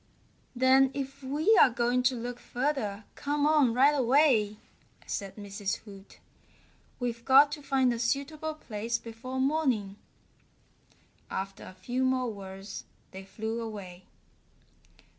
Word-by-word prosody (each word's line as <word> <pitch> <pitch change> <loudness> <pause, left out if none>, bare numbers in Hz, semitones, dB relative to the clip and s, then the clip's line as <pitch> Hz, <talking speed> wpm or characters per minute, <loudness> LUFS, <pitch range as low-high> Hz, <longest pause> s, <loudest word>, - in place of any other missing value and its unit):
"Then 260 +2 +5
if 275 0 -5
we're 290 +5 +4
going 240 +1 +1
to 250 +1 +2
look 240 +1 -5
further 240 -6 -2
come 290 0 -1
on 300 -5 +4
right 270 +5 +5
away," 255 -6 +3 0.5
said 195 -1 -5
Mrs. 200 -1 -4
Hoot. 200 -2 -14 0.8
"We've 235 -2 -3
got 275 +3 +6
to 295 0 -5
find 265 -3 +2
a 235 - -4
suitable 295 +6 -2
place 230 -4 -3
before 235 +3 -7
morning." 260 -9 0 1.3
After 195 0 -5
a 185 - -11
few 250 +6 -2
more 255 -3 +1
words 195 0 -8 0.3
they 190 +1 -9
flew 220 +3 -4
away. 195 -5 -8
245 Hz, 125 wpm, -29 LUFS, 210-275 Hz, 1.3 s, got